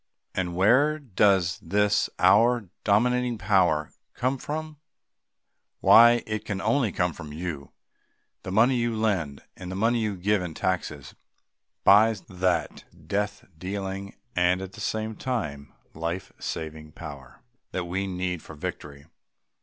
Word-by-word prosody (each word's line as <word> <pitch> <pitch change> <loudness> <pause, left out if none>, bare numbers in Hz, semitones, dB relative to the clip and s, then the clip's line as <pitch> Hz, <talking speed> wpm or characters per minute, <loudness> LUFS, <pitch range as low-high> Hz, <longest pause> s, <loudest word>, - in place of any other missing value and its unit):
And 90 -2 -2
where 130 +11 +4
does 100 - +2
this 105 +4 +1
our 115 -1 +4
dominating 125 +3 +2
power 90 -7 +2 0.2
come 130 +2 -1
from? 155 +2 -5 1.0
Why, 120 +1 +7
it 110 -1 -3
can 100 - -3
come 100 - -4
only 115 -2 +2
from 90 -4 -2
you. 75 -3 -6 0.7
The 95 - -6
money 120 +6 +4
you 120 -1 0
lend 95 -11 -1
and 90 -1 -8
the - - -4
money 115 +4 +2
you 105 -3 -1
give 100 +2 +1
in 85 -3 -5
taxes 75 -7 -3 0.7
buys 105 0 +5
that 90 -2 -1 0.2
death 105 +1 -2
dealing, 95 +2 -5 0.2
and 90 +1 +3
at 95 0 -7
the 105 - -11
same 110 0 -2
time 75 - -4 0.2
life 85 +1 -4
saving 80 -1 -6
power 70 -5 -10 0.3
that 90 -2 -3
we 95 +3 -2
need 90 -2 -3
for 80 - -11
victory. 70 -1 -7
95 Hz, 135 wpm, -26 LUFS, 85-110 Hz, 1.0 s, Why